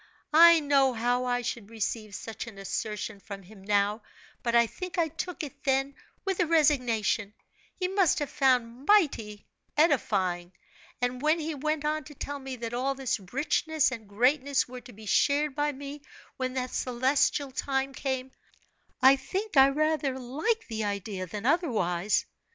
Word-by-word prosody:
I 335 +1 +9
know 275 -3 +3
how 245 +2 0
I 245 0 0
should 225 -3 -4
receive 215 -1 -4
such 225 +2 -6
an 220 -4 -10
assertion 210 +1 -4
from 195 -1 -9
him 195 +1 -15
now, 205 +2 +1 0.4
but 235 -1 0
I 235 0 +6
think 365 +11 -7
I 330 -2 +2
took 330 +3 -5
it 280 -1 -9
then 270 +1 +1 0.3
with 385 -2 -1
a 355 - +2
resignation, 245 -9 +2 0.4
he 365 - -1
must 380 -2 +2
have 290 -2 -2
found 255 -1 +1
mighty 270 - +2 0.3
edifying; 190 - +1 0.5
and 250 0 -1
when 310 +3 +3
he 320 0 -3
went 300 +1 -2
on 305 0 0
to 295 - -12
tell 285 +1 -5
me 265 -1 -6
that 230 -1 -6
all 265 +3 0
this 265 -4 -1
richness 300 +2 +1
and 220 -5 -7
greatness 265 +6 +2
were 250 0 -9
to 245 +1 -13
be 215 0 -13
shared 285 +6 +2
by 295 +1 0
me 285 +1 -8 0.3
when 255 -1 -3
that 255 -1 -3
celestial 265 +2 +1
time 270 +1 -1
came, 260 -1 -3 0.7
I 270 +1 +8
think 385 +9 -4
I 270 0 +8
rather 300 -2 0
liked 300 - -2
the 220 -1 -3
idea 200 -2 -3
than 205 +5 -6
otherwise. 215 - +1
260 Hz, 165 wpm, -28 LUFS, 225-295 Hz, 0.7 s, I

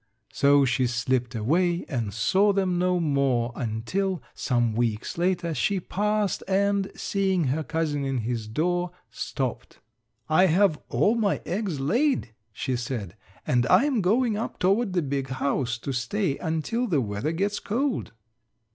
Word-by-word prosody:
So 140 0 +5
she 130 0 +1
slipped 120 +1 -1
away 170 +10 +1
and 115 -8 -2
saw 195 - +3
them 185 -3 +1
no 180 0 +2
more 135 -6 +1
until, 160 - -2
some 120 -3 0
weeks 115 -1 -1
later, 175 -1 0
she 190 +7 0
passed 210 +2 -1
and, 200 0 +1
seeing 190 -3 0
her 150 +5 0
cousin 155 -3 -1
in 135 -1 -1
his 115 -1 -3
door, 175 +9 0 0.2
stopped: 130 -4 -4 0.5
"I 170 +5 +5
have 175 -2 +3
all 150 - +3
my 220 -4 +1
eggs 185 -4 -2
laid," 235 - +1 0.2
she 130 +5 -2
said, 120 -6 -4 0.3
"and 125 -1 +2
I'm 260 - +4
going 220 +4 +2
up 225 - -4
toward 195 +2 +1
the 175 -3 +1
big 135 -1 -2
house 130 -2 -1
to 130 +3 -5
stay 140 - -1
until 165 +10 -1
the 165 -9 +2
weather 105 +4 -2
gets 200 +5 -1
cold." 255 +5 -1
160 Hz, 145 wpm, -26 LUFS, 125-195 Hz, 0.5 s, So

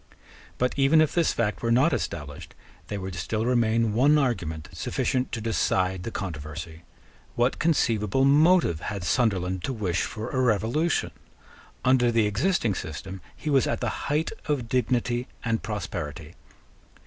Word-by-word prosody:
But, 125 0 +1
even 140 +4 +5
if 155 -1 +3
this 170 -2 +2
fact 105 -3 -1
were 115 - 0
not 130 +8 +4
established, 75 -3 -5 0.3
there 105 - -4
would 95 0 -5
still 100 +6 -2
remain 115 -2 +2
one 140 +7 +4
argument 85 - -1
sufficient 130 0 -1
to 115 - -3
decide 95 -4 0
the 105 - -4
controversy. 80 -4 -6 0.5
What 120 +2 +1
conceivable 135 - +2
motive 150 - +4
had 100 +1 -5
Sunderland 95 -1 0
to 135 - -2
wish 95 -7 -1
for 110 0 -4
a 130 - 0
revolution? 125 - +1 0.7
Under 125 -2 +4
the 115 -2 +3
existing 115 - +1
system 95 +3 -6
he 155 - -4
was 135 -2 +3
at - - -1
the 120 -3 -3
height 150 +3 0 0.2
of 140 -6 -1
dignity 120 0 0 0.2
and 115 -1 0
prosperity. 85 -7 -5
115 Hz, 150 wpm, -26 LUFS, 95-130 Hz, 0.7 s, even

